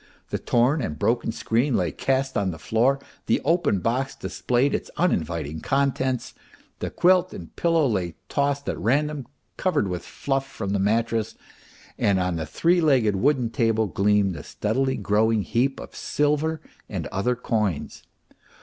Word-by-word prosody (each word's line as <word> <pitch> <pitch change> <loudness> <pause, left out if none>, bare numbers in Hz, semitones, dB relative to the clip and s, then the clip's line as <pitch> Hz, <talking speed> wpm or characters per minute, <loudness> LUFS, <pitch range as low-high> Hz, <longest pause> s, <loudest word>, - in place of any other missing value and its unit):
The - - -1
torn 125 +6 +2
and 75 -11 -3
broken 115 +6 +1
screen 120 +3 0
lay 85 -3 0
cast 135 - -1
on 100 -4 +1
the 80 - -5
floor, 120 - +2 0.3
the - - +3
open 165 - +2
box 130 +5 -1
displayed 95 +9 0
its - - -2
uninviting 80 - 0
contents, 130 - 0 0.5
the - - -3
quilt 185 0 +3
and - - -10
pillow 165 -2 +2
lay 95 - -1
tossed 140 0 0
at - - -2
random, 145 +2 0 0.3
covered 155 - +1
with 90 -1 -3
fluff 135 -1 -2
from 100 -7 -5
the 100 - +1
mattress, 110 +2 0 0.6
and 100 -2 +3
on 90 -1 0
the 80 -1 -4
three 170 - +2
legged 130 -10 +3
wooden 125 +2 +1
table 115 -2 +2
gleamed 100 0 +2
the - - -7
steadily 130 +5 -1
growing 110 +1 +2
heap 130 +6 0
of - - -9
silver 150 +2 0 0.3
and - - -4
other 125 +6 0
coins. 105 - -2
115 Hz, 155 wpm, -24 LUFS, 100-140 Hz, 0.6 s, the